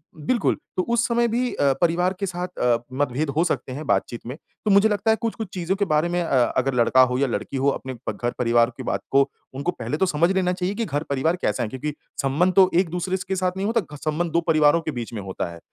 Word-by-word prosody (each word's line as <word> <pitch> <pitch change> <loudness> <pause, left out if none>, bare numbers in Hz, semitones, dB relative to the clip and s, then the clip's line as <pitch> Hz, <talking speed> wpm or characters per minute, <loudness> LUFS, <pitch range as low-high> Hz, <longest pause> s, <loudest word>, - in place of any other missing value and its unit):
बिल्कुल 190 +11 0 0.2
तो 185 - +2
उस 235 0 +2
समय 235 0 +2
भी 245 +2 0
अ, 140 -1 +2
परिवार 175 +2 +2
के 200 - -1
साथ 180 -1 -3
अ, 120 -1 +3 0.2
मतभेद 140 +2 -1
हो 165 - +4
सकते 135 - -2
हैं 150 +3 -6
बातचीत 120 - -1
में। 130 - -5 0.3
तो 210 - +3
मुझे 200 +2 +5
लगता 210 +2 +1
है 220 - +4
कुछ-कुछ 225 -1 -3
चीज़ों 180 +1 -1
के 200 0 0
बारे 155 +1 +1
में 175 0 0
अ, 130 -6 +3
अगर 135 +1 +1
लड़का 125 +2 +4
हो 125 0 +3
या 140 0 +2
लड़की 135 +2 -3
हो 135 +2 +2
अपने 130 -1 -4
प - - +1
घर-परिवार 120 -1 +2
की - - -6
बात - - -2
को 135 0 +4 0.3
उनको 140 +6 -1
पहले 120 +2 -4
तो 190 - +2
समझ 170 +1 +2
लेना 185 -1 +1
चाहिए 185 +2 -2
कि 230 +1 -1
घर-परिवार 145 +1 -1
कैसा 120 - 0
है? 110 - -3
क्योंकि 140 +5 -4 0.3
संबंध 150 +7 +2
तो 190 -2 +7
एक-दूसरे 180 +1 -1
स 180 - -6
के 190 - 0
साथ 185 -1 0
नहीं 195 +2 -1
होता। 215 -10 -1
संबंध 155 +3 -2
2 170 - +2
परिवारों 155 0 +4
के 160 - -3
बीच 120 -3 -6
में 105 - -4
होता 95 -2 -4
है। 85 - -11
160 Hz, 250 wpm, -23 LUFS, 135-185 Hz, 0.3 s, तो